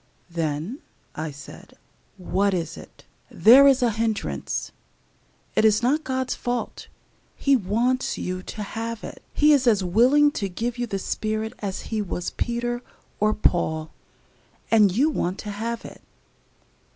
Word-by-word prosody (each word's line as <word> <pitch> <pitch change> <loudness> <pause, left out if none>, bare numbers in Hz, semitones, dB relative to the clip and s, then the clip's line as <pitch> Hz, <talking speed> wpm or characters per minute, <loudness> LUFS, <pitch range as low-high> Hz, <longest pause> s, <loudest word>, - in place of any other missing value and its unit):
"Then," 165 - -3 0.3
I 155 +1 -4
said, 145 0 -12 0.4
"what 195 +1 0
is 170 -2 -3
it? - - -14 0.2
There 265 +5 +7
is 270 -2 +4
a 235 - +3
hindrance. 220 -1 -2 0.8
It - - +2
is 215 +1 +4
not 290 +6 +2
God's 260 -2 -2
fault. 245 0 -4 0.5
He 275 -1 +3
wants 240 +4 0
you 185 0 -3
to 210 +3 -6
have 225 +2 -5
it - - -8
He 300 0 +4
is 270 -3 +3
as 210 -5 +4
willing 255 +11 +4
to 200 -8 -3
give 235 +6 -3
you 240 - -1
the 195 - -2
Spirit 215 +3 -3
as 195 -2 -4
He 215 - +1
was 180 -3 -4
Peter 240 0 -2 0.4
or 215 +1 +2
Paul, 160 -5 0 0.8
and 210 -4 +6
you 275 - +2
want 185 - -2
to 210 - -6
have 230 +3 -4
it. - - -11
220 Hz, 150 wpm, -24 LUFS, 190-245 Hz, 0.8 s, There